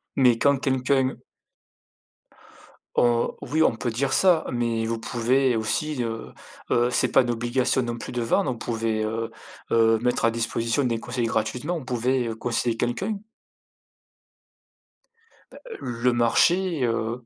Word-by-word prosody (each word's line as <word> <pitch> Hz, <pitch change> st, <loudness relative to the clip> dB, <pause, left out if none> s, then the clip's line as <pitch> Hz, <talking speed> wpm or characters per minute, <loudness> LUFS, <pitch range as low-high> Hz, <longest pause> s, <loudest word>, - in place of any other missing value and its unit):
Mais 125 Hz, -4 st, +4 dB
quand 140 Hz, +2 st, +3 dB
quelqu'un 130 Hz, 0 st, +1 dB, 1.8 s
Heu, 120 Hz, -1 st, +3 dB
oui 160 Hz, +1 st, +1 dB
on -, -, +3 dB
peut 125 Hz, -, -2 dB
dire 135 Hz, +4 st, -1 dB
ça, 175 Hz, +1 st, +4 dB
mais 115 Hz, -2 st, -1 dB
vous 115 Hz, 0 st, -2 dB
pouvez 125 Hz, +2 st, +1 dB
aussi, 125 Hz, +5 st, -1 dB
heu, 115 Hz, -1 st, -5 dB, 0.4 s
heu, 120 Hz, +1 st, +3 dB
c'est -, -, +2 dB
pas -, -, +4 dB
une 120 Hz, -, -3 dB
obligation 120 Hz, +3 st, 0 dB
non 120 Hz, -1 st, -3 dB
plus -, -, -7 dB
de 125 Hz, -, -2 dB
vendre, 130 Hz, +8 st, +1 dB
vous 120 Hz, -, -5 dB
pouvez, 115 Hz, -1 st, -2 dB
heu 115 Hz, +1 st, -3 dB, 0.4 s
heu, 115 Hz, 0 st, +4 dB
mettre 125 Hz, 0 st, 0 dB
à 115 Hz, -, +3 dB
disposition 115 Hz, +3 st, -1 dB
des 115 Hz, -2 st, 0 dB
conseils 125 Hz, 0 st, -3 dB
gratuitement, 120 Hz, +9 st, -2 dB
vous 130 Hz, -, -11 dB
pouvez, 125 Hz, 0 st, 0 dB
heu, 110 Hz, -, -4 dB
conseiller 115 Hz, 0 st, -1 dB
quelqu'un. 190 Hz, -, -2 dB, 2.3 s
Ben, -, -, -13 dB, 0.2 s
le 120 Hz, +1 st, 0 dB
marché, 165 Hz, +7 st, +2 dB
heu 115 Hz, +1 st, -2 dB
120 Hz, 145 wpm, -24 LUFS, 115-130 Hz, 2.3 s, Mais